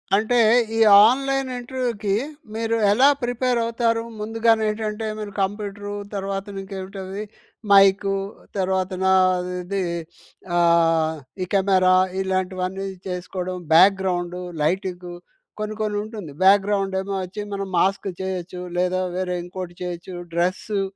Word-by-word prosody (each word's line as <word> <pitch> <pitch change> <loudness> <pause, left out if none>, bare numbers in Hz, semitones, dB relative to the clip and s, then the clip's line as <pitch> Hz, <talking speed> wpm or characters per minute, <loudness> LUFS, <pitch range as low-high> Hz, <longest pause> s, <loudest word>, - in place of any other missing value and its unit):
అంటే 220 +4 +2 0.4
ఈ - - -1 0.3
ఆన్‍లైన్ 270 +1 0
ఇంటర్వ్యూకి 240 -5 -2 0.4
మీరు 225 0 0 0.2
ఎలా 255 +7 +5 0.2
ప్రిపేర్ 245 0 0
అవుతారు? 230 0 0 0.2
ముందుగానే 225 +1 +2
ఏంటంటే 215 0 -3
మీరు 210 -1 -5
కంప్యూటరు, 205 +1 -3 0.2
తర్వాతన 195 0 -4
ఇంకేంటది 195 +1 -6 0.5
మైకు 195 0 +5 0.4
తర్వాతనా 190 0 0 0.5
అది 190 +1 -2 0.7
ఆహ్, 165 -2 +3 0.3
ఈ - - -2
కెమెరా 190 -2 +4 0.3
ఇలాంటివన్నీ 185 0 -2 0.2
చేసుకోవడం 180 0 -4 0.2
బ్యాక్‍గ్రౌండు, 180 -1 +3 0.2
లైటింగు 180 +2 -2 0.5
కొన్ని, 215 0 -3
కొన్ని 210 -1 -1
ఉంటుంది 210 -8 -8
బ్యాక్‍గ్రౌండేమో 195 0 +2
వచ్చి, 185 +3 -6
మనం 195 -1 -4
మాస్క్ 195 +2 +1
చేయొచ్చు 185 -1 -4 0.2
లేదా 180 +1 +1 0.2
వేరే 180 -1 -1
ఇంకోటి 180 0 -7
చేయొచ్చు 175 +1 -6 0.2
డ్రెస్సు. 185 +4 0
195 Hz, 105 wpm, -23 LUFS, 185-210 Hz, 0.7 s, ఎలా